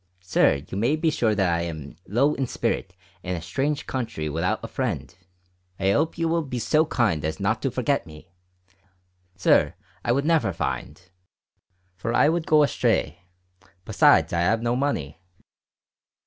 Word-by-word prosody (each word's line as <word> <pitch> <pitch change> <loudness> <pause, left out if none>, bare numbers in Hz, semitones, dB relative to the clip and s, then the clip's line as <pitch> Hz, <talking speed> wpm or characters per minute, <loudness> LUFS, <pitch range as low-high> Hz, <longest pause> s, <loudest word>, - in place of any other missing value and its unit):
Sir 80 -6 +2
you 95 - -4
may 120 +8 +2
be 155 0 +1
sure 110 -6 +1
that 95 -2 +2
i 85 -1 +1
ham 80 -4 -6
low 135 +8 +2
in 135 -3 -2
spirit 100 -6 -2 0.3
in 90 0 -3
a - - -4
strange 140 - -2
contry 110 -12 -3
without 80 +5 -1
a - - -4
friend. - - -3 0.7
I 95 0 +2
hope 155 +10 0
you 165 0 0
will 165 +1 +1
be 135 -5 -5
so 155 +7 +2
kind 100 - 0
as 80 +4 -3
not 110 +3 0
to 135 - 0
forget 130 - -1
me. 80 +3 -14 1.1
Sir, 90 - +3 0.3
I - - +1
would 140 +4 +1
never 150 - +2
find 85 - -4 1.0
for 115 +6 -3
I 150 - +5
would 165 0 -1
go 155 -1 +5
astray, 115 -8 0 0.6
besides 110 - +4
i 85 - +1
have 110 +7 +1
no 120 +1 +1
money." 85 - -2
115 Hz, 165 wpm, -24 LUFS, 90-140 Hz, 1.1 s, I